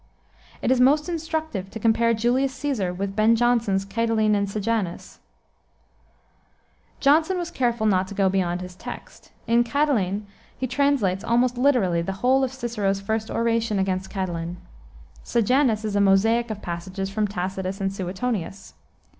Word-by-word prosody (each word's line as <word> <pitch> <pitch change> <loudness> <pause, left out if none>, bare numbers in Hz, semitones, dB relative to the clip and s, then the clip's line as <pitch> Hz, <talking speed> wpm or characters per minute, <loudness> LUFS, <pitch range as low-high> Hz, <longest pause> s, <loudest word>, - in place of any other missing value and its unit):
It - - +2
is 255 -1 +3
most 295 +5 +4
instructive 315 - -3
to 225 - -7
compare 230 +1 +3
Julius 255 +4 +1
Caesar 265 -10 -1
with 195 +2 -4
Ben 220 +2 +4
Jonson's 230 -5 +1
Catiline 220 +1 +1
and 200 -1 0
Sejanus. 210 -3 -3 1.8
Jonson 315 +6 +3
was 350 -1 -4
careful 235 -6 0
not 190 -3 +2
to 200 - -8
go 195 -1 +2
beyond 180 -2 0
his 180 0 -8
text. - - -10
In 235 +1 +3
Catiline 230 -7 0 0.3
he 260 - -2
translates 250 -7 +1
almost 240 +2 +2
literally 240 -10 +2
the 190 +3 -3
whole 265 +1 +4
of 260 - -1
Cicero's 225 -7 -2
first 220 +2 -2
oration 230 -2 0
against 190 0 -1
Catiline. 175 -3 -3 0.7
Sejanus 235 -1 +1
is 210 -1 -2
a 205 - +3
mosaic 225 +5 +3
of 210 -1 -6
passages, 185 +3 -4
from 210 +1 0
Tacitus 190 0 -4
and 195 0 -1
Suetonius. 195 +1 -4
215 Hz, 145 wpm, -24 LUFS, 195-245 Hz, 1.8 s, most